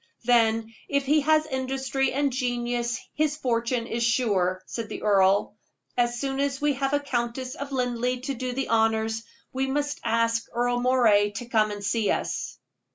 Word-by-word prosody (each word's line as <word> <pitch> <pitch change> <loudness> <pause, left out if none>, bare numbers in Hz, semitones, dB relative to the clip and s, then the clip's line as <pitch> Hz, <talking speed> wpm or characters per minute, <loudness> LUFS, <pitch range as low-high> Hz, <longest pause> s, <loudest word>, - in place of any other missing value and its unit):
"Then, 225 -1 +2 0.2
if 280 -1 +1
he 300 +2 +3
has 310 +1 +3
industry 265 -1 -1
and 280 0 0
genius, 240 -1 -1
his 300 -1 0
fortune 235 -2 0
is 235 0 -3
sure," 200 -6 +1
said 230 -2 -5
the - - -6
earl. 200 0 +3 0.4
"As 240 0 +1
soon 270 0 -2
as 280 -1 0
we 295 0 +2
have 270 +1 -1
a 290 - +3
Countess 255 -1 -3
of 280 -2 -6
Linleigh 250 -1 -1
to 275 +2 -3
do 255 0 -3
the 265 +2 -3
honors, 225 0 +1 0.3
we 265 +1 0
must 290 +2 -2
ask 230 0 +1
Earle 245 0 +1
Moray 235 -5 +4
to 240 - -4
come 220 -2 +2
and 205 -1 -6
see 215 0 0
us." - - -2
245 Hz, 170 wpm, -26 LUFS, 230-270 Hz, 0.4 s, Moray